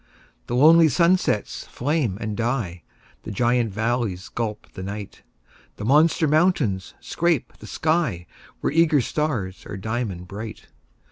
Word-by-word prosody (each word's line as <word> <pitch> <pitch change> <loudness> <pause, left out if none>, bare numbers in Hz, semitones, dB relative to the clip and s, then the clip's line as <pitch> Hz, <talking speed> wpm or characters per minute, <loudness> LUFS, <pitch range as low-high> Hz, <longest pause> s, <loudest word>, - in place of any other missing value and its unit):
The 120 - -2
lonely 160 +4 +7
sunsets 170 - +1
flame 130 - -1
and 105 -2 -3
die; 115 -7 -2 0.4
The - - -8
giant 120 +1 +1
valleys 110 -3 -2
gulp 110 -3 -4
the - - -7
night; 100 +1 -7 0.5
The 105 - -6
monster 155 +5 +4
mountains 150 - +1
scrape 170 -6 -1
the 110 - -11
sky, 155 - 0 0.4
Where - - -1
eager 160 -3 +4
stars 120 -9 -2
are - - -6
diamond 105 -4 -4
bright. 105 +3 -8
120 Hz, 130 wpm, -23 LUFS, 100-155 Hz, 0.5 s, lonely